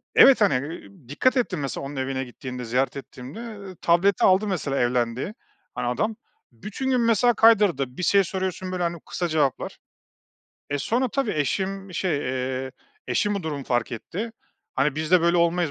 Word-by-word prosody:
evet, 265 -4 +8
hani, 145 -3 +2
eee, - - -12 0.2
dikkat 255 - +2
ettim 240 - 0
mesela 140 -1 -4
onun 145 - -7
evine 130 0 -2
gittiğimde, 125 0 -7
ziyaret 130 +4 0
ettiğimde, 135 - -9 0.3
eee, 185 - -9
tableti 175 +3 +3
aldı 190 +3 +4
mesela 150 -8 -1
evlendiği, 125 - 0 0.4
hani, 120 - -2
adam. 210 - 0 0.4
Bütün 210 - -5
gün 255 -2 +3
mesela 235 +1 +4
kaydırdı. 195 - +4
Bir 180 - -3
şey 200 +2 +5
soruyorsun, 185 0 -3
böyle, 180 -1 -2
hani, 170 0 -1
kısa 175 - -2
cevaplar. 150 -4 0 0.9
Eee, 145 - 0
sonra 245 - 0
tabii 270 -3 -1
eşim 190 +5 -2
şey, 175 -6 0
eee, 130 0 -3 0.3
eşim 205 0 +1
bu 200 - -3
durumu 145 -4 -4
fark 120 -1 0
etti. 205 - -5 0.4
Hani, 135 +1 +1
"Biz 155 +1 -3
de 180 - +6
böyle 170 +1 +3
olmayız." 170 -1 +2
170 Hz, 170 wpm, -24 LUFS, 135-200 Hz, 0.9 s, evet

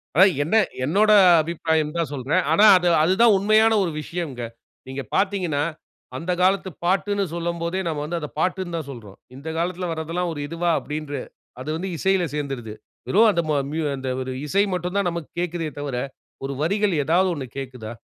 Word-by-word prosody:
அதான் 190 +4 +7
என்ன 160 +9 0 0.3
என்னோட 205 +9 +3 0.3
அபிப்பிராயன்னு 160 -1 -1
தான் 165 -3 -1
சொல்றேன். 145 +7 0
ஆனா 205 +7 +6
அது 180 -1 0 0.2
அது 175 +4 +3
தான் 235 -2 +7
உண்மையான 215 +3 +4
ஒரு 175 - -2
விஷயம்ங்க. 150 -7 -5 0.4
நீங்க 135 +1 -5
பாத்தீங்கன்னா, 190 -7 0 0.5
அந்த 170 +2 -3
காலத்து 190 +1 +2 0.2
பாட்டுன்னு 200 +2 +1
சொல்லும்போதே, 170 +1 -2
நாம 155 -3 -2
வந்து 170 +2 -3
அத 150 - -5
பாட்டுன்னு 180 0 -1
தான் 155 -4 -5
சொல்றோம். 105 -7 -11 0.2
"இந்த 140 +4 -10
காலத்தில 180 +2 -2
வர்றதெல்லாம் 165 +2 -2
ஒரு 150 - -7
இதுவா?" 170 +2 -1
அப்படின்ற 150 -1 -6 0.5
அது 140 - -6
வந்து 190 +3 -4
இசையில 190 +1 +2
சேந்துருது. 135 -7 -4 0.3
வெறும் 220 +3 +5
அந்த 170 - +1
ம - - +2 0.2
மியூ 160 +1 -2
அந்த 135 0 -6
ஒரு 130 0 -4 0.2
இசை 200 +6 +3
மட்டும் 180 +1 -3
தான் 200 -2 +1
நமக்கு 170 -4 -6
கேக்குதே 175 -2 -2
தவிர, 140 -3 -3 0.5
ஒரு 135 - -3
வரிகள் 200 +4 +1
ஏதாவது 180 +6 +2
ஒண்ணு 140 -3 -5
கேட்குதா? 125 -5 -6
170 Hz, 175 wpm, -23 LUFS, 150-185 Hz, 0.5 s, அதான்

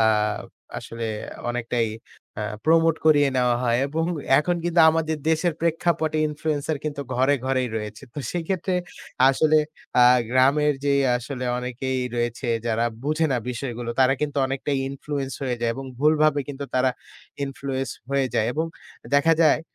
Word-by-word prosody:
আ - - +5 0.8
আসলে 115 0 -7 0.4
অনেকটাই 120 -1 -1 0.5
আ - - -1 0.2
প্রমোট 165 0 +4
করিয়ে 145 -2 +5
নেওয়া 125 -1 +3
হয়। 120 0 +2
এবং 160 +3 -1 0.3
এখন 175 +3 +1
কিন্তু 175 0 +3
আমাদের 160 -1 -1
দেশের 165 +1 +1
প্রেক্ষাপটে 165 -2 0
ইনফ্লুয়েন্সার 150 0 -2
কিন্তু 145 -2 -3
ঘরে 130 +3 +3
ঘরেই 130 -2 +1
রয়েছে। 105 +2 -6
তো - - -5
সেইক্ষেত্রে 180 +2 -2 0.6
আসলে 155 +3 +3 0.5
আ - - +8 0.3
গ্রামের 140 +3 +3
যে 140 - +3 0.2
আসলে 125 +1 -5
অনেকেই 125 +1 -3 0.2
রয়েছে 120 +1 -2 0.2
যারা 115 +1 +1 0.2
বুঝে 155 +2 +1
না 125 - +1
বিষয়গুলো 120 -1 -4
তারা 130 +1 +5
কিন্তু 145 -1 -2
অনেকটাই 135 +1 -2
ইনফ্লুয়েন্স 140 -1 -4
হয়ে 125 -2 -1
যায় 115 -1 +1
এবং 135 +1 -6
ভুলভাবে 155 0 +3
কিন্তু 140 0 -5
তারা 130 0 +3 0.5
ইনফ্লুয়েন্স 135 -1 -4 0.2
হয়ে 135 -1 +2
যায়। 110 - +2
এবং 160 +2 -1 0.5
দেখা 165 +3 +5
যায় 155 - +4
140 Hz, 145 wpm, -24 LUFS, 125-155 Hz, 0.8 s, আ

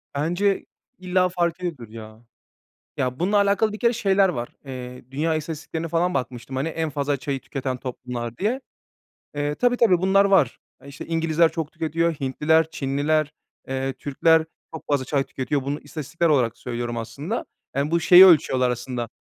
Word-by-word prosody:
Bence 175 +7 0 0.3
illa 185 0 +1
fark 175 -1 -1
ediyordur 155 -11 -5
ya. 110 0 -11 0.8
Ya 125 +1 -2
bununla 200 +4 +2
alakalı 200 +2 +2
bir 215 - -7
kere 235 0 +3
şeyler 195 -4 +3
var. 120 -8 -4 0.2
Eee, 125 -2 -8
dünya 160 +3 0
istatistiklerine 160 +1 -4
falan 170 +2 0
bakmıştım, 125 0 -4
hani, 135 +5 -1
en 160 0 -2
fazla 145 -1 -1
çayı 135 0 -3
tüketen 130 -2 -4
toplumlar 125 -2 -6
diye. 240 +7 -1 0.7
Eee, 145 0 -1
tabii, 245 +4 +2
tabii, 200 -8 +4
bunlar 195 +2 +4
var. 195 -11 +3 0.2
E, 140 - -14
işte, 140 - -9
İngilizler 165 0 +2
çok 160 -2 -4
tüketiyor, 165 0 0
Hintliler, 150 +4 +1
Çinliler, 145 +2 0 0.4
eee, 135 0 -2
Türkler 160 +4 +2 0.3
çok 160 - -7
fazla 140 -2 +1
çay 135 0 0
tüketiyor. 135 +1 -2
Bunu 140 +2 -3
istatistiksel 165 +2 -2
olarak 125 -6 +2
söylüyorum 120 -1 -4
aslında. 145 - -4 0.3
Yani 140 +3 0
bu 170 0 +2
şeyi 180 +2 +9
ölçüyorlar 130 -7 +4
aslında. 120 -1 -4
150 Hz, 160 wpm, -23 LUFS, 130-170 Hz, 0.8 s, şeyi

